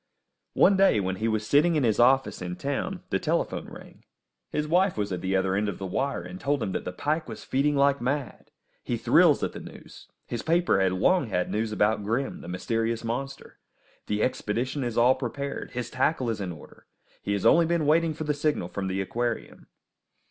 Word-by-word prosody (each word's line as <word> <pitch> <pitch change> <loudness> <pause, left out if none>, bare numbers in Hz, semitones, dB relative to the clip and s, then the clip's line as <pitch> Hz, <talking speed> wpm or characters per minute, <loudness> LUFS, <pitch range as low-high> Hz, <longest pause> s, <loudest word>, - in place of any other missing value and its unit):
One 200 - +5
day, 195 - +4
when 95 -1 -2
he 110 +3 -1
was 110 -1 -1
sitting 155 +8 +3
in 150 - +2
his 110 -3 +1
office 130 -1 +3
in 90 0 -4
town, 175 - -3
the - - +1
telephone 170 -1 -1
rang. - - -13 0.5
His 150 0 -2
wife 180 - +2
was 105 -1 -2
at 90 -2 -3
the 95 +1 -1
other 95 0 +1
end 105 +2 0
of 100 - -5
the 95 - -5
wire, 130 +1 -2
and 90 +1 -9
told 140 -3 0
him 95 - -2
that - - -4
the - - -3
pike 155 - -2
was - - -8
feeding 145 +2 +1
like 140 -1 +3
mad. 135 +1 -3 0.3
He - - -2
thrills - - +4
at - - -1
the - - -7
news. - - -13 0.2
His 120 - -4
paper 170 - +2
has 95 -1 +2
long 125 - +2
had 90 -4 -1
news 110 +1 -1
about 105 0 +1
Grim, 115 +6 -2
the - - -10
mysterious 115 +6 -2
monster. 130 +4 -5 0.5
The 105 0 0
expedition 130 +4 -1
is 120 -2 -3
all 120 +2 +6
prepared, 140 +2 -5
his 120 -2 -4
tackle 130 -2 0
is 105 -2 -4
in 95 -2 -3
order; 80 - -14 0.3
he 100 - -2
has 100 - -2
only 170 -1 +5
been 170 -2 +1
waiting 160 +1 +2
for 155 - -4
the 150 -1 0
signal 145 - -1
from 100 -1 -4
the 95 +1 -1
aquarium. 120 +4 -4
120 Hz, 210 wpm, -26 LUFS, 100-145 Hz, 0.5 s, all